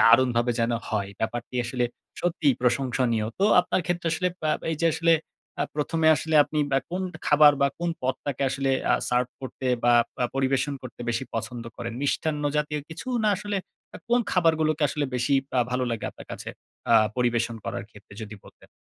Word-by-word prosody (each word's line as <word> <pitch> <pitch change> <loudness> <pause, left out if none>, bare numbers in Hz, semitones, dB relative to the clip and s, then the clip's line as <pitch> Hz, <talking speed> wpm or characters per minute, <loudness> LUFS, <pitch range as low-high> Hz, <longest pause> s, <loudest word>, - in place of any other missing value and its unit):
দারুণভাবে 120 0 +5
যেন 115 +1 +1 0.2
হয়। 100 -3 -1
ব্যাপারটি 120 +2 -3
আসলে 125 +1 -1 0.4
সত্যিই 165 -6 +2
প্রশংসনীয়। 125 -3 +1
তো 195 - +3 0.2
আপনার 180 +1 0
ক্ষেত্রে 175 -1 -1
আসলে 180 +3 +1
অ্যা 155 - +1 0.2
এই 160 - -1
যে 170 - +3
আসলে 165 0 +3 0.4
অ্যা - - 0
১ম 155 +2 -1
এ - - +8
আসলে 160 +1 -2
আপনি 155 - -3
বা 135 - +5
কোন 180 +2 -2 0.2
খাবার 150 0 +7
বা 140 - +4
কোন 170 0 -1
পদটাকে 130 +1 -2
আসলে 135 0 0 0.2
আ - - +5
সার্ভ 125 0 +1
করতে 130 0 -6 0.2
বা 120 - +5 0.3
আ - - +3
পরিবেশন 135 +1 +1
করতে 125 -2 -10
বেশি 115 +3 -1
পছন্দ 115 +1 -4
করেন। 115 -1 -5
মিষ্টান্ন 150 +1 0
জাতীয় 150 0 -1
কিছু? 165 +6 -9 0.2
না - - +4
আসলে 205 +1 -3 0.4
আ - - -5
কোন 240 +1 +4
খাবারগুলোকে 160 -3 +2
আসলে 150 +1 -1
বেশি 125 +2 0 0.3
আ - - +5
ভালো 125 +1 0
লাগে 115 -2 -3
আপনার - - -13
কাছে - - -7 0.4
আ - - +7 0.2
পরিবেশন 120 -2 +1
করার 120 - -4
ক্ষেত্রে 105 -1 -15
যদি 110 0 -7
বলতেন? - - -17
135 Hz, 185 wpm, -26 LUFS, 120-155 Hz, 0.4 s, এ